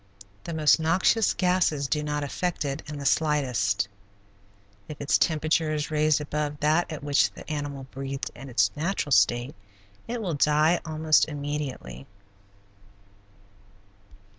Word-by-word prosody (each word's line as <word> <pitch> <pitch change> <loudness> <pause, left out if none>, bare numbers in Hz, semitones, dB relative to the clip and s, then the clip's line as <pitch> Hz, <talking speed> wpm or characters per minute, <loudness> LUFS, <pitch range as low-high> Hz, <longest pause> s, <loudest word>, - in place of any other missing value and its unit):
The 170 - -5
most 155 0 +4
noxious 185 +7 +2
gases 180 -6 +1
do 150 +2 0
not 150 -1 -2
affect 170 +3 -2
it 140 -1 -3
in 150 - -6
the 140 - -6
slightest. 125 -11 +1 1.0
If 150 - -9
its 145 - +2
temperature 155 0 +1
is 150 0 -3
raised 155 -1 +2
above 150 0 -3
that 155 +4 +2
at 155 -2 -6
which 145 -1 +3
the - - -12
animal 145 -3 -4
breathed 135 0 -5
in 135 +2 -10
its 100 -4 +2
natural 160 -1 -2
state 120 +5 +3 0.5
it 240 +1 -3
will 190 -7 -2
die 150 +3 +3
almost 155 -1 +2
immediately. 145 -2 -5
150 Hz, 135 wpm, -26 LUFS, 140-160 Hz, 1.0 s, most